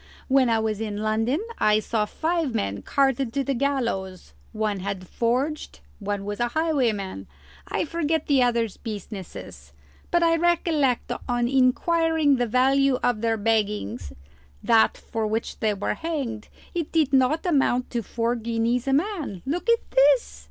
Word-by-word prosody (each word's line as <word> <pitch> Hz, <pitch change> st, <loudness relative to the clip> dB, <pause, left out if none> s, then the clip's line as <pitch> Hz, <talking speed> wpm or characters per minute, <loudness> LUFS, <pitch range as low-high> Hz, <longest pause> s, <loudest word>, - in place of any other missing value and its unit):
When 265 Hz, -2 st, +4 dB
I 225 Hz, -, +3 dB
was 220 Hz, -1 st, -1 dB
in 210 Hz, -2 st, -3 dB
London 225 Hz, -, 0 dB
I 210 Hz, 0 st, +4 dB
saw 215 Hz, 0 st, -1 dB
five 320 Hz, +1 st, -1 dB
men 100 Hz, -, -2 dB
carted 270 Hz, -3 st, +1 dB
to 280 Hz, -, 0 dB
the 275 Hz, -, -1 dB
gallows; 235 Hz, -, -2 dB, 0.2 s
one 215 Hz, -2 st, -2 dB
had 190 Hz, -1 st, -5 dB
forged, 260 Hz, -, -2 dB, 0.2 s
one 205 Hz, -1 st, -3 dB
was 205 Hz, 0 st, -4 dB
a 240 Hz, -, +1 dB
highwayman 235 Hz, -, -1 dB, 0.4 s
I -, -, -1 dB
forget 320 Hz, -1 st, -1 dB
the 275 Hz, -3 st, +3 dB
others' 235 Hz, -4 st, +1 dB
businesses; 195 Hz, -, -8 dB, 0.4 s
but 345 Hz, 0 st, +2 dB
I 330 Hz, 0 st, +4 dB
recollect 325 Hz, -6 st, +1 dB, 0.2 s
on 240 Hz, -1 st, +1 dB
inquiring 290 Hz, +3 st, +2 dB
the 245 Hz, -1 st, 0 dB
value 270 Hz, +3 st, +3 dB
of 240 Hz, -3 st, +1 dB
their 225 Hz, -1 st, +1 dB
baggings 205 Hz, -, -1 dB, 0.5 s
that 225 Hz, -1 st, +4 dB
for 225 Hz, -1 st, -3 dB
which 220 Hz, +2 st, -3 dB
they 215 Hz, -2 st, +1 dB
were 200 Hz, -, -2 dB
hanged 275 Hz, -10 st, -4 dB, 0.3 s
it 340 Hz, -4 st, -3 dB
did 305 Hz, -4 st, +1 dB
not 270 Hz, +6 st, +3 dB
amount 270 Hz, -6 st, +1 dB
to 235 Hz, -, -1 dB
four 230 Hz, +2 st, -1 dB
guineas 235 Hz, +2 st, -1 dB
a 270 Hz, -, +2 dB
man. 300 Hz, -, -1 dB
Look 350 Hz, -, -2 dB
at 465 Hz, 0 st, +1 dB
this!" 270 Hz, -, +3 dB
245 Hz, 155 wpm, -24 LUFS, 215-285 Hz, 0.5 s, When